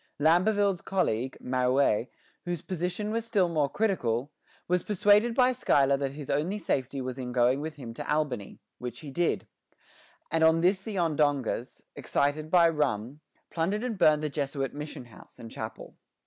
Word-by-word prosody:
Lamberville's 185 +5 +3
colleague, 130 - -1
Mareuil, 125 -2 +1 0.4
whose 175 -3 -3
position 180 +4 -3
was 230 +1 -1
still 210 -5 +2
more 155 -4 0
critical, 140 - 0 0.4
was 180 0 +2
persuaded 210 +4 +3
by 255 0 +5
Schuyler 140 - +3
that 135 -1 -3
his 145 -1 -8
only 160 +9 0
safety 135 - -2
was 130 0 -5
in 125 -1 -4
going 125 +2 +2
with 155 0 -5
him 125 -5 -8
to - - -5
Albany, 145 -9 -2 0.2
which 125 -1 -6
he 145 -3 -8
did; 170 +4 0 0.9
and 165 0 +2
on 160 +1 +5
this 185 +2 +3
the 205 0 -5
Onondagas, 145 -7 0
excited 150 +2 -1
by 170 0 +6
rum, 140 -5 -1 0.3
plundered 190 +7 -1
and 250 -3 -2
burned 155 -5 +4
the 150 - 0
Jesuit 140 -2 -2
mission 150 -3 -7
house 120 - -17
and 115 -1 -10
chapel. 110 0 -7
150 Hz, 160 wpm, -28 LUFS, 130-180 Hz, 0.9 s, by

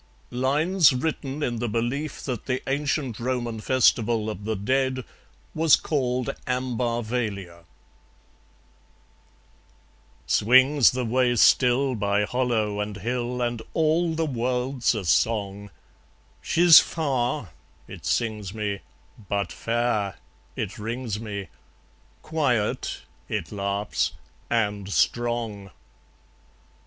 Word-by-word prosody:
Lines 145 +7 +3
Written 140 +1 -3
in 120 -4 -1
the 120 0 -2
Belief 120 +7 -2
That 125 -5 -4
the 130 0 -1
Ancient 135 -3 -1
Roman 120 -2 -2
Festival 115 -2 +2
of 105 0 -8
the 110 0 -1
Dead 130 +4 0 0.5
Was 160 -1 +5
Called 125 -5 -1 0.2
Ambarvalia 115 -8 -2 2.6
Swings 130 +4 +5
the 125 -1 -2
way 125 +1 +2
still 130 +3 +4
by 100 -2 +1
hollow 110 -4 0
and 105 -1 -3
hill, 120 +3 -2
And 120 -1 -2
all 160 +1 +2
the 165 0 0
world's 125 -1 0
a 105 -4 -4
song; 100 +1 0 0.7
"She's 170 0 +7
far," 130 - -1 0.4
it - - -10
sings 105 -4 -1
me, 105 -2 -2 0.5
"but 100 0 -1
fair," 115 -4 -1 0.4
it 105 -1 -4
rings 115 0 -4
me, 100 -3 -6 0.7
"Quiet," 130 -9 -1 0.3
it 100 -7 -3
laughs, 100 0 -1 0.4
"and 105 -4 0
strong!" 115 -3 -1
120 Hz, 100 wpm, -25 LUFS, 105-130 Hz, 2.6 s, She's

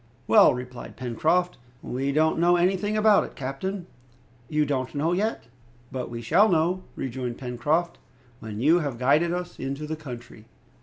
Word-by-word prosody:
"Well!" - - +6
replied 125 0 -8
Pencroft, 155 +9 0 0.2
"we 135 +3 -2
don't 155 +3 +2
know 175 +1 +4
anything 190 +4 +1
about 215 -1 +5
it, - - -9
captain!" 170 +8 -4 0.6
"You 150 0 +2
don't 130 -1 -2
know 160 +4 +1
yet?" 210 - -1 0.5
"But 130 -2 -4
we 120 0 -6
shall 205 - +4
know," 175 +2 +1
rejoined 125 -2 -4
Pencroft, 145 +7 -1 0.4
"when 110 -1 -7
you 160 +6 +5
have 140 -7 -3
guided 150 +7 +3
us 180 0 -4
into 140 +3 -4
the 160 +1 -3
country." 120 -7 -10
150 Hz, 155 wpm, -25 LUFS, 125-175 Hz, 0.6 s, Well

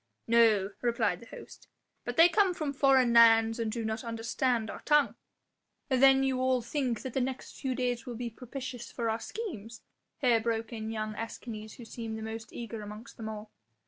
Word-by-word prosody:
"No," 225 -4 +4
replied 235 -3 +1
the 235 - -14
host, - - -12 0.4
"but - - -4
they 330 +1 +9
come 375 0 +2
from 300 -4 -3
foreign 265 -3 +4
lands 225 -1 +6
and 225 -1 -1
do 230 0 -3
not 220 +1 -3
understand 230 0 -1
our - - -9
tongue." 295 -8 +3 0.8
"Then 270 0 +5
you 260 -1 0
all 255 -2 +2
think 250 -3 -2
that 260 -3 -5
the 265 - +1
next 260 0 -5
few 260 -2 -1
days 245 -1 -2
will 245 - -5
be 235 0 -4
propitious 250 +1 -7
for 230 -2 -1
our 220 - -2
schemes?" 230 - -7 0.3
here 245 -4 +3
broke 225 0 -2
in 220 -1 -4
young 215 -1 -3
Escanes 220 -1 -7
who 240 - -11
seemed 225 -1 -6
the 220 - -6
most 220 0 -6
eager 230 -2 -6
amongst 210 +2 -9
them 220 -1 -5
all. 215 0 -8
235 Hz, 190 wpm, -30 LUFS, 225-255 Hz, 0.8 s, they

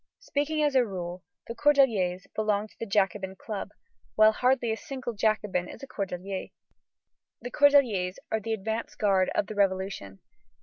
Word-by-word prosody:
Speaking 305 -7 -1
as 295 -2 +2
a 260 -2 +5
rule, 180 -4 -6 0.2
the 230 - -5
Cordeliers 230 -10 +3
belong 215 -1 0
to - - -22
the 230 - -4
Jacobin 195 -1 0
Club, 205 +1 -6 0.5
while 215 0 +7
hardly 250 0 +1
a - - 0
single 260 -1 -6
Jacobin 210 -4 0
is - - -11
a - - -7
Cordelier. 195 -4 -4 0.9
The 245 - -7
Cordeliers 245 -11 +4
are 220 - +1
the 225 +1 -3
advance 220 +2 -3
guard 195 -3 +2
of - - +1
the 215 - -7
Revolution. 190 - -1
215 Hz, 160 wpm, -28 LUFS, 190-245 Hz, 0.9 s, while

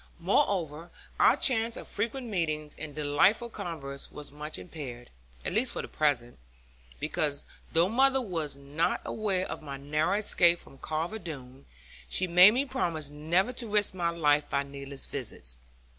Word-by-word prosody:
Moreover, 170 -3 +1 0.3
our - - +6
chance 230 -3 +2
of - - -7
frequent 235 +5 -2
meetings 155 -8 -2
and 150 -2 -7
delightful 180 +11 +2
converse 140 -8 -5
was 150 -1 -8
much 150 +1 -6
impaired, 130 -8 -8 0.3
at - - -2
least 235 +5 +2
for - - -3
the - - -6
present; 130 -6 0 0.6
because 145 - -1 0.3
though 165 +2 +4
mother 265 +5 +3
was 165 - -3
not 140 +4 -1
aware 195 -4 0
of - - -5
my 140 -3 -6
narrow 150 +7 0
escape 175 -5 +5
from 135 - -12
Carver 165 +8 -3
Doone, 135 -6 -9 0.4
she 185 - +2
made 180 +5 +8
me 270 +3 +1
promise 170 - -2
never 170 +10 +1
to 240 -2 -3
risk 210 -2 +2
my 175 -2 0
life 150 -3 +2
by 140 - +1
needless 140 0 -5
visits. 65 - -7
160 Hz, 160 wpm, -29 LUFS, 145-200 Hz, 0.6 s, made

